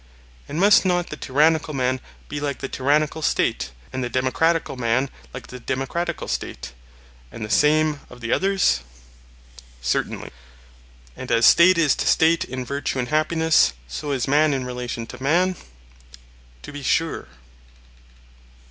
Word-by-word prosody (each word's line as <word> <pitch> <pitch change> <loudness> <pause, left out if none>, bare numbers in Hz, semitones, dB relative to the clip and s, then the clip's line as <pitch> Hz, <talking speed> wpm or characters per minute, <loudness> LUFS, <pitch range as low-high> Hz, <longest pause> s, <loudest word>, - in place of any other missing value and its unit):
And 155 - -3
must 205 +2 +6
not 175 -2 0
the - - -4
tyrannical 155 +2 +1
man 130 0 0 0.3
be 145 - -5
like 145 -2 -3
the 135 - -5
tyrannical 150 +4 0
State, 65 - 0 0.2
and 130 0 -2
the 120 - -3
democratical 135 +6 0
man 125 +2 0 0.2
like - - -8
the 125 - -10
democratical 135 +8 -3
State; - - -5 0.6
and 110 - -6
the 105 - -7
same 150 +1 +3
of 125 - -13
the 115 -1 -2
others? 195 - +2 1.0
Certainly. - - -2 0.8
And 130 - -7
as 115 0 +4
State 180 +1 +7
is 155 -5 +4
to - - -2
State 165 +1 +3
in 130 0 -5
virtue 140 0 -3
and 125 -1 -2
happiness, 155 - +3
so 145 - -5
is 130 -4 -1
man 145 +1 +3
in 130 -1 -3
relation 125 -2 -5
to 115 - -11
man? 175 +7 +2 1.1
To - - -9
be 145 0 -8
sure. 165 - -1
140 Hz, 150 wpm, -22 LUFS, 125-160 Hz, 1.1 s, State